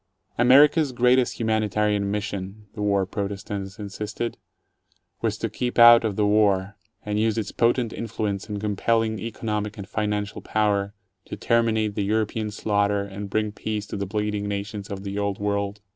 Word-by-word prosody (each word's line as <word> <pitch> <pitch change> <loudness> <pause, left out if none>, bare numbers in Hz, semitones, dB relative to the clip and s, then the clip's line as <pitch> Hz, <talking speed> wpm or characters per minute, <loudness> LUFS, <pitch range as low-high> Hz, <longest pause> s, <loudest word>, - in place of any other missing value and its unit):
America's 140 +4 +5
great 125 +1 +4 0.2
humanitarian 105 -2 +1
mission, 100 0 -4
the 105 - -6
war 100 -2 +2
protestants 100 0 -5
insisted, 105 +2 -4 0.9
was - - 0
to - - -2
keep 125 -1 -3
out 120 0 +9
of 110 -3 -1
the 105 - +2
war, 105 -2 +2 0.3
and 105 0 -1
use 110 0 +1
its 110 - -2
potent 120 -1 +1
influence 105 -3 -3
and 105 -1 -3
compelling 110 +1 0
economic 105 -1 -3
and 100 -1 -7
financial 105 -1 -2
power 100 -1 0 0.3
to - - -6
terminate 110 -2 +1
the 105 - -1
European 110 +1 -1
slaughter 100 -1 0
and 100 0 -7
bring 110 +1 0
peace 105 0 -4
to - - -7
the 100 -1 -3
bleeding 105 0 -2
nations 100 0 -4
of 100 -1 -6
the 100 0 -4
old 100 -1 -1
world. 100 0 -2
105 Hz, 160 wpm, -24 LUFS, 100-110 Hz, 0.9 s, out